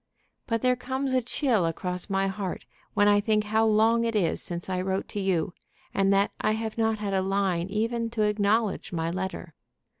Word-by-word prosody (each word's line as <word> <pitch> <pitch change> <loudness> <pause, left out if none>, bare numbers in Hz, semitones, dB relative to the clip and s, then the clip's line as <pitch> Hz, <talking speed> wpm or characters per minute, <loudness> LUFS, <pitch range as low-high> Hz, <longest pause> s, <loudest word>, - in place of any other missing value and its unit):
But 230 -2 -1
there 250 0 +4
comes 260 +2 -2
a 255 - +3
chill 245 - +1
across 180 +3 -2
my 195 0 +1
heart 195 -1 -4 0.3
when 205 - +4
I 205 0 +5
think 215 0 +2
how 220 +1 +2
long 225 +2 +4
it 230 -1 -1
is 180 -6 +1
since 175 0 -5
I 185 -1 -1
wrote 190 +1 -2
to 205 - -4
you, 190 -2 0 0.4
and 195 0 +2
that 200 +1 +3
I 215 - +2
have 220 0 -3
not 225 -1 +1
had 205 -2 -3
a 190 - +2
line 190 -2 0
even 230 +3 -1
to 215 - +3
acknowledge 210 0 +1
my 165 -1 -1
letter. 185 -2 -5
205 Hz, 200 wpm, -27 LUFS, 190-225 Hz, 0.4 s, I